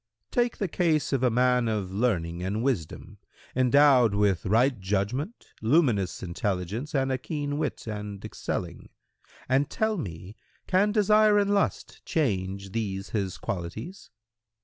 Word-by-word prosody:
Q 245 - +2
"Take 240 -1 -1
the 195 - -1
case 160 -5 +1
of 135 - +1
a 130 - +4
man 125 0 +2
of 105 -4 -2
learning 90 -6 -1
and 100 +5 -2
wisdom, 115 - -3 0.4
endowed 130 -3 +5
with 100 -4 +1
right 120 +4 +3
judgment, 105 - -3
luminous 110 - +2
intelligence 100 - -3
and 135 -1 +1
a 130 - -1
keen 145 +1 -3
wit 150 -3 -3
and 105 -2 -6
excelling, 85 -1 -5 0.6
and 135 +3 +2
tell 220 0 0
me 90 - -7 0.3
can 195 +3 +2
desire 210 0 +4
and 205 0 +2
lust 200 - -1
change 100 - -1
these 100 -3 -3
his 95 -4 -2
qualities?" 95 - -6
120 Hz, 140 wpm, -27 LUFS, 95-150 Hz, 0.6 s, endowed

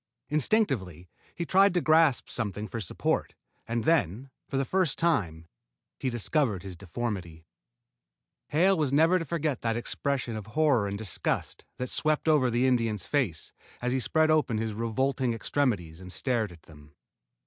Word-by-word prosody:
Instinctively 130 - 0 0.2
he 170 - -3
tried 195 +1 +4
to - - +4
grasp 160 -4 +3
something 105 -2 -3
for 115 - -5
support, - - -1 0.3
and 115 0 -1
then, 130 - +1 0.2
for 135 - -3
the 135 - +1
first 185 -2 +1
time, 90 - 0 0.5
he 130 - -1
discovered 120 - 0
his 95 -2 -7
deformity. 90 -3 -5 1.0
Hale 180 +6 +3
was 150 -6 0
never 165 +6 +4
to 165 - -4
forget 155 -6 -2
that 115 0 0
expression 125 0 -2
of 105 -2 -6
horror 140 -10 +3
and 100 0 -3
disgust 105 -3 -3
that 125 - -3
swept 155 0 0
over 150 -5 +4
the 120 +2 +1
Indian's 115 -7 +1
face 100 - -1 0.3
as 125 0 -1
he 130 - +1
spread 155 +4 +2
open 135 -8 +2
his 110 0 -2
revolting 120 +2 0
extremities 100 - -1
and 90 0 -8
stared 115 -3 -1
at 85 -2 -15
them. 75 -1 -17
120 Hz, 160 wpm, -28 LUFS, 100-150 Hz, 1.0 s, tried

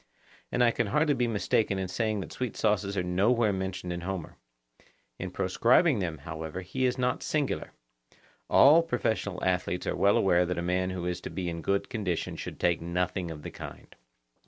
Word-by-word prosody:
And 125 - +2
I 120 - +5
can 120 -1 -1
hardly 150 +8 +2
be 125 -3 +1
mistaken 105 -2 +1
in 95 -1 -2
saying 110 +2 -1
that - - -8
sweet 125 -3 -4
sauces 100 -2 +1
are 90 - +1
nowhere 105 +5 +2
mentioned 95 -2 -3
in 85 - -5
Homer. 90 -2 -5 0.8
In 90 - -4
proscribing 115 - +3
them, 85 -4 -2
however, 80 +3 -6
he 95 +8 -2
is 125 +1 +1
not 125 0 0
singular; 150 -3 -1 0.8
all 150 +5 +7
professional 110 - -2
athletes 90 -1 0
are - - -1
well 100 +1 +4
aware 90 -2 +4
that 90 - -2
a 85 - -1
man 90 +1 0
who 90 -2 -4
is 90 0 -2
to - - -6
be 90 -2 -3
in 85 -1 -5
good 100 +4 0
condition 100 -8 -2
should - - -7
take 85 -2 +2
nothing 90 +1 -2
of 75 -2 -8
the - - -6
kind. - - -10
95 Hz, 190 wpm, -29 LUFS, 90-115 Hz, 0.8 s, all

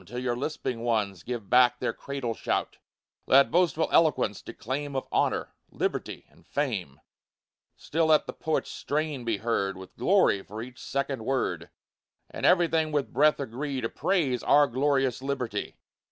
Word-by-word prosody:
till 125 - -9
your 125 -1 -1
lisping 130 -2 -3
ones 105 -6 -1
Give 120 -2 -5
back 125 +1 +5
their - - -2
cradle 135 -4 -4
shout; - - -2 0.5
Let 135 +1 +6
boastful 170 -2 +2
eloquence 150 -10 +3
declaim 140 +4 -5
Of 130 - -2
honor, - - 0 0.2
liberty, - - -3
and - - -23
fame; 100 - -3 0.8
Still 160 +1 0
let 155 -1 +4
the - - -6
poet's 160 - -2
strain 150 -3 -2
be 115 -3 0
heard, 100 -4 -1
With 95 0 -12
glory 185 - +3
for 105 +3 -9
each 125 0 -11
second 140 -3 -3
word, 135 +2 -1 0.6
And - - 0
everything 165 -3 +3
with 145 -2 -1
breath 150 +4 +4
agree 135 +1 -3
To 115 -2 -2
praise 145 -11 0
"our 145 0 +5
glorious 135 -1 0
liberty!" 125 -6 -3
130 Hz, 155 wpm, -27 LUFS, 115-150 Hz, 0.8 s, Let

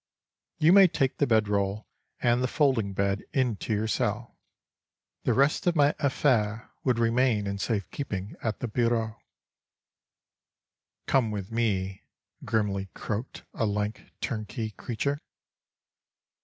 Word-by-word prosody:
"You 160 +3 +5
may 195 -1 +9
take 135 -5 -1
the 145 - +3
bed 110 -2 +3
roll 100 +1 -1 0.4
and 120 +1 +3
the 130 - +2
folding 125 -8 +1
bed 100 +1 0
into 125 -5 0
your 110 +1 +1
cell"—the - - -1 1.0
rest 140 +6 +2
of 175 - +3
my 145 -1 +4
affaires 120 -7 +2 0.2
would 125 -3 +2
remain 115 -2 +2
in 100 0 -3
safe 100 -3 -1
keeping 100 -8 -4
at 110 -2 -2
the 125 - -1
bureau. 115 -1 0 1.8
"Come 125 -5 +2
with 100 0 -5
me," 100 -5 -1 0.4
grimly 105 -3 0
croaked 110 +4 -4
a 115 - 0
lank 105 +1 -2 0.2
turnkey 110 0 -3
creature. 140 +7 -3
110 Hz, 125 wpm, -28 LUFS, 105-130 Hz, 1.8 s, may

